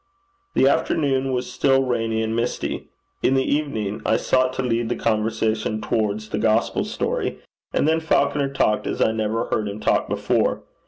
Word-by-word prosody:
The 135 - +5
afternoon 135 -3 +1
was 125 -1 -1
still 135 -1 +3
rainy 115 -3 0
and 110 0 -2
misty. 115 +1 -2 0.3
In 135 - +3
the 135 - +3
evening 110 -9 -1
I - - +2
sought 130 0 +2
to 130 - -2
lead 115 -2 0
the 120 - 0
conversation 110 0 0
towards 110 -1 -1
the 105 - -2
gospel 110 +1 +1
story; - - -2 0.3
and - - +1
then 160 +1 +3
Falconer 140 -3 +1
talked 105 -6 +1
as - - -3
I - - +3
never 110 +1 -1
heard 105 - 0
him 100 +1 -6
talk - - +1
before. - - 0
115 Hz, 170 wpm, -22 LUFS, 110-135 Hz, 0.3 s, The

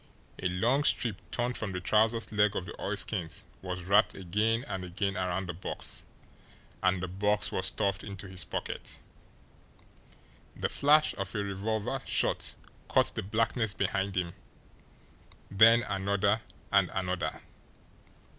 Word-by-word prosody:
A 90 - +1
long 120 +11 +2
strip 115 -7 +3
torn 120 +1 -1
from 110 -5 -3
the 90 - -2
trousers' 110 +4 +2
leg 105 -1 +3
of 90 - -2
the 85 - -7
oilskins 100 -3 -1 0.2
was 90 -1 -5
wrapped 100 +4 +4
again 105 +7 0
and 95 -1 -4
again 95 +2 -2
around 95 +1 -1
the 90 - -3
box 85 - -3 0.8
and 95 -1 +2
the - - -1
box 105 +3 +1
was - - 0
stuffed 100 -1 0
into 100 -1 -7
his 95 -2 -1
pocket. - - -5 1.6
The - - -1
flash 150 +2 +4
of 100 +3 -3
a 105 - 0
revolver 110 +6 -2
shot - - +2 0.3
cut - - +4
the - - -3
blackness 110 +1 0
behind 95 0 -1
him, 85 -2 -1 1.2
then 115 +4 +7
another, 100 +1 +1 0.3
and 100 -3 +4
another. 90 -1 -2
100 Hz, 135 wpm, -30 LUFS, 95-110 Hz, 1.6 s, then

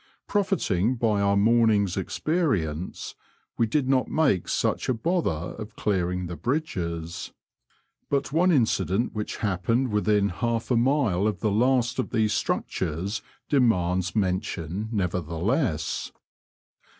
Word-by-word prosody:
Profiting 130 - +1
by 110 -4 +1
our 100 0 +3
morning's 105 -3 +3
experience, 95 - -1 0.4
we 115 - +2
did 130 +4 0
not 130 -1 +2
make 140 - +1
such - - 0
a 130 - +2
bother 170 +9 0 0.3
of 105 0 -8
clearing 90 -3 -1
the 85 0 -5
bridges; 85 - -3 0.8
but 140 -1 0
one 180 +3 +4
incident 110 - +1
which 105 -1 -4
happened 115 +7 +1
within 105 -1 +2
half 115 +6 -2
a - - +4
mile 120 -6 +2
of 105 -3 -2
the 110 - +1
last 125 +3 +2
of 130 - -1
these 110 -3 +1
structures 95 +5 -2 0.3
demands 95 - +2
mention 95 0 -2
nevertheless. 90 - -1
105 Hz, 120 wpm, -26 LUFS, 90-125 Hz, 0.8 s, one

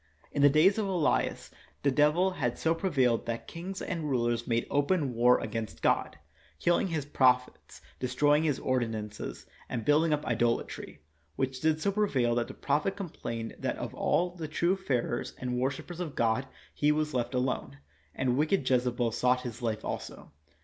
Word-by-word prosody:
In 145 - -1
the 145 - +8
days 170 +9 +4
of 210 - 0
Elias 165 - 0 0.3
the 140 - +3
devil 150 +7 +3
had 125 -9 -2
so 160 - +2
prevailed 135 -10 +1
that 115 0 -3
kings 185 +3 -6
and 165 -5 -3
rulers 120 -2 0
made 115 0 +1
open 145 -1 +1
war 120 +2 +5
against 110 -9 -5
God, - - +1 0.4
killing 175 +2 +2
His 160 -5 -2
proph 125 -3 +4
ets, - - -18 0.2
destroying 145 +4 +3
His 150 -4 +1
ordinances, 115 -5 -3 0.2
and 115 -4 -3
building 155 +4 +4
up 150 0 0
idolatry, 115 - -1 0.3
which 130 -1 -2
did 155 0 +2
so 200 - +1
prevail 140 - +1
that 120 0 0
the - - -9
prophet 150 +7 0
complained 120 - -5
that - - -2
of - - -5
all 180 +1 +1
the 170 -3 -6
true 170 +4 +1
fearers 125 -10 -2
and 125 -1 -3
wor 130 +1 +2
shipers 165 +5 -8
of 165 -5 -4
God 115 +3 +1 0.3
he 150 0 +2
was 150 0 0
left 120 0 -1
alone, 125 - -1 0.4
and 125 -1 0
wicked 155 -1 +1
Jezebel 125 -2 +1
sought 125 +2 +2
his 120 -1 -7
life 110 -3 -2
also. - - -6
135 Hz, 175 wpm, -29 LUFS, 120-160 Hz, 0.4 s, the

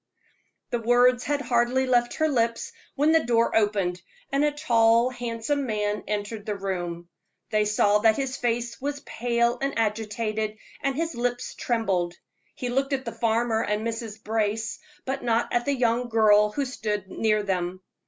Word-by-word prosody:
The 240 - 0
words 245 +2 +4
had 290 +1 0
hardly 245 0 +2
left 240 -2 +2
her 315 - +2
lips, 235 - 0 0.2
when 295 +3 +3
the 325 0 +4
door 230 -1 +2
opened, 200 -5 +1 0.3
and 275 +1 +2
a 295 - +4
tall, 235 -4 +3
handsome 245 +3 -2
man 210 -1 -1
entered 210 +1 -4
the 210 - -1
room. 175 -3 -4 0.4
They 215 -1 +2
saw 210 0 +3
that 220 0 +4
his 270 0 -2
face 240 -1 -2
was 285 +1 -3
pale 235 -1 0
and 275 -2 -1
agitated, 215 0 -1 0.2
and 275 -1 0
his 330 +2 -2
lips 245 0 -2
trembled. 190 -7 -1 0.4
He 250 - -4
looked 270 +3 0
at 265 0 -2
the - - -3
farmer 230 -1 +1
and 210 +1 -1
Mrs. 225 -2 -5
Brace, 220 0 -1 0.3
but 270 +1 -3
not 235 -1 +1
at 240 0 +1
the 285 -1 +1
young 240 -1 +1
girl 210 -2 +5
who 280 +5 -1
stood 210 -6 -3
near 215 +1 +1
them. 185 -1 -2
230 Hz, 165 wpm, -26 LUFS, 210-250 Hz, 0.4 s, girl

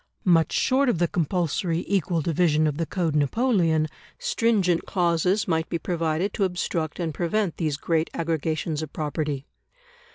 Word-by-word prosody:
Much 165 -3 +4
short 270 +1 +2
of 235 - +1
the 175 +1 +2
compulsory 170 0 -1
equal 180 -4 +1
division 155 -1 +2
of 150 -2 0
the 165 -1 -1
Code 170 -5 -1
Napoleon, 165 - +2 0.3
stringent 225 - +1
clauses 180 +3 +1
might 160 -2 0
be 170 - -1
provided 165 +2 -1
to 200 - 0
obstruct 175 -4 -2
and 165 -3 -2
prevent 180 +3 -1
these 155 -4 -1
great 160 +1 0
aggregations 160 -1 -2
of 155 -2 -6
property. 150 -2 -3
170 Hz, 150 wpm, -25 LUFS, 155-180 Hz, 0.3 s, Much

